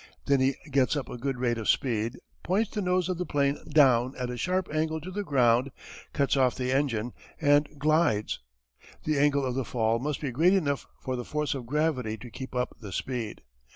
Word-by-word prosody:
Then 140 -1 +3
he 130 +1 +2 0.2
gets 135 +1 +3
up 145 - -3
a - - -6
good 135 +1 -2
rate 120 -2 0
of 110 - -3
speed, 115 -2 +1 0.2
points 200 +5 0
the 210 - -2
nose 180 -1 +1
of 180 -2 -2
the - - 0
'plane 140 -1 +1
down 130 -4 +4
at 125 -1 -3
a - - -4
sharp 180 +10 0
angle 160 +1 0
to 175 +4 -8
the 205 +2 -2
ground, 125 -5 +3 0.4
cuts 140 0 +1
off 130 -2 +3
the 125 0 -2
engine, 125 -4 0 0.3
and 145 +1 +4
glides. 150 -7 +2 0.6
The 155 -2 +1
angle 140 -1 +3
of 125 - -1
the 135 +1 -1
fall 115 -1 0
must 145 +3 -2
be 140 -4 -3
great 165 +9 +4
enough 145 -7 0
for 130 - -3
the 125 - -4
force 150 +3 -1
of 130 -4 -6
gravity 130 -6 0
to 120 0 -11
keep 130 +1 -8
up 125 0 -1
the 105 -4 -8
speed. 115 +2 -4
135 Hz, 210 wpm, -28 LUFS, 125-150 Hz, 0.6 s, down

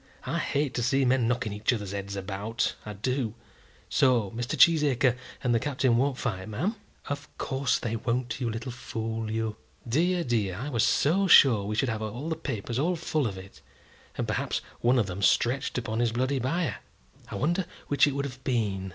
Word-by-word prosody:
I - - -1
hate 140 -2 0
to 120 - -1
see 135 +3 +2
men 125 -2 +3
knocking 115 -3 -1
each 105 +1 +1
other's 105 -5 -3
heads 100 0 -4
about, 100 +3 -2
I 105 - -4
do. 115 +2 -2 0.5
So 120 -7 +3
Mr. 120 +2 -3
Cheesacre 140 -6 +5 0.3
and 125 -2 +2
the 115 - +3
Captain 130 -2 +1
won't 130 +2 +1
fight, 95 -6 -3
ma'am?" 170 - -1 0.3
"Of 145 0 -5
course 135 -1 0
they 115 -1 -3
won't, 120 +3 -2
you 120 - 0
little 115 +3 -4
fool, 115 -2 -4
you." 110 -1 -2 0.3
"Dear, 170 +8 +2
dear; 110 - 0
I 130 +9 -4
was 115 -6 +1
so 190 +7 +3
sure 120 - +7
we 105 +1 -2
should 135 - +1
have 110 -1 -2
had 120 +9 -4
the - - +1
papers 125 -6 -3
all 175 +5 +1
full 155 -4 0
of 95 -3 -5
it, 95 +1 -12 0.6
and - - -1
perhaps - - -1 0.2
one 125 +2 +3
of 115 - +3
them 95 +1 -5
stretched 120 +7 +2
upon 115 -2 -2
his 120 -2 +1
bloody 130 +3 0
bier! 135 - -1 0.5
I - - -6
wonder 170 +5 0 0.2
which 145 0 +4
it 140 - -1
would 140 0 -1
have 130 -1 -8
been? 100 -7 -1
120 Hz, 195 wpm, -28 LUFS, 110-140 Hz, 0.6 s, sure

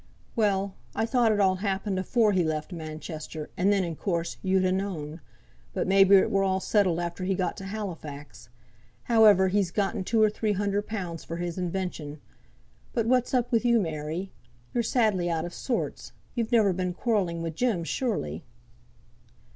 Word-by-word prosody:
"Well, 200 -3 +1 0.2
I 225 - +1
thought 235 -1 +3
it 210 - +1
all 190 -2 +3
happened 195 0 -1
afore 215 +3 +2
he 185 -3 +2
left 155 +2 -2
Manchester, 155 -1 -7
and 190 +3 +2
then 200 -2 +2
in 170 -2 -3
course 170 -1 -2
you'd 190 -1 +2
ha' 185 - +2
known. 165 -5 -4 0.5
But - - 0
may 195 +1 +6
be 195 +1 +6
it 190 - +4
were 195 - +2
all 190 -1 +1
settled 190 -4 +2
after 175 +1 -3
he 190 +1 0
got 180 -2 -1
to 195 - -7
Halifax; 165 - -7 0.5
however, 210 -5 +5
he's 195 -1 +1
gotten 200 +2 -1
two 225 +4 +1
or 215 -1 +5
three 215 0 -1
hunder 200 +1 0
pounds 185 -6 -5
for 165 - -6
his 175 -1 -3
invention. 175 -5 -4 0.7
But 230 -2 0
what's 250 +1 +2
up 245 -2 +1
with 230 -1 +2
you, 235 -1 +4
Mary? 160 +1 -3 0.4
you're 240 - +2
sadly 215 -7 +1
out 165 -1 -1
o' - - -4
sorts. 240 +7 -3 0.2
You've 230 -3 -2
never 215 -5 +4
been 180 0 -2
quarrelling 185 -8 0
wi' 165 - -2
Jem, 195 0 0
surely?" 165 - -2
190 Hz, 180 wpm, -27 LUFS, 170-210 Hz, 0.7 s, may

